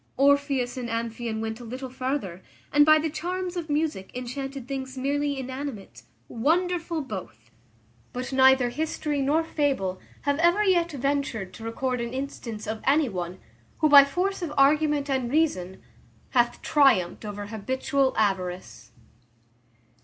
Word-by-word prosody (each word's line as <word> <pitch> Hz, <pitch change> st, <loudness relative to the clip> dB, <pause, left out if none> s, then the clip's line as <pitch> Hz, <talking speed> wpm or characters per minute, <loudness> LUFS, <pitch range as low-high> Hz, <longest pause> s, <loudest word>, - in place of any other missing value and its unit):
Orpheus 275 Hz, -2 st, +2 dB
and 245 Hz, -2 st, -4 dB
Amphion 230 Hz, -1 st, -3 dB
went 220 Hz, +1 st, -4 dB
a -, -, -9 dB
little 255 Hz, +3 st, -6 dB
farther, 255 Hz, -9 st, -3 dB, 0.3 s
and 295 Hz, +1 st, +6 dB
by 310 Hz, 0 st, +8 dB
the 310 Hz, +1 st, 0 dB
charms 360 Hz, +4 st, -4 dB
of 335 Hz, -3 st, -4 dB
music 295 Hz, -10 st, -1 dB
enchanted 270 Hz, +1 st, -5 dB
things 265 Hz, -1 st, -5 dB
merely 285 Hz, +2 st, -1 dB
inanimate. 260 Hz, -4 st, -6 dB, 0.3 s
Wonderful, 335 Hz, +5 st, 0 dB
both! 150 Hz, -, -8 dB, 0.6 s
but 250 Hz, +2 st, -5 dB
neither 260 Hz, -1 st, +5 dB
history 300 Hz, 0 st, -2 dB
nor 295 Hz, +4 st, +2 dB
fable 270 Hz, -, -1 dB, 0.2 s
have 285 Hz, +1 st, 0 dB
ever 345 Hz, +5 st, +4 dB
yet 345 Hz, -4 st, +2 dB
ventured 275 Hz, -8 st, -2 dB
to 225 Hz, -, -10 dB
record 250 Hz, +2 st, -2 dB
an 235 Hz, +1 st, -4 dB
instance 240 Hz, -5 st, -5 dB
of 220 Hz, 0 st, -4 dB
any 285 Hz, 0 st, +3 dB
one, 180 Hz, -2 st, -5 dB, 0.4 s
who, 310 Hz, -, +3 dB
by 285 Hz, -1 st, +10 dB
force 365 Hz, +8 st, -1 dB
of 335 Hz, -4 st, -3 dB
argument 295 Hz, +1 st, +3 dB
and 260 Hz, -3 st, -1 dB
reason, 190 Hz, -, 0 dB, 0.5 s
hath 240 Hz, -1 st, +1 dB
triumphed 230 Hz, -, +3 dB
over 205 Hz, -1 st, -5 dB
habitual 260 Hz, +5 st, -1 dB
avarice. 180 Hz, -, -2 dB
265 Hz, 140 wpm, -26 LUFS, 225-295 Hz, 0.6 s, by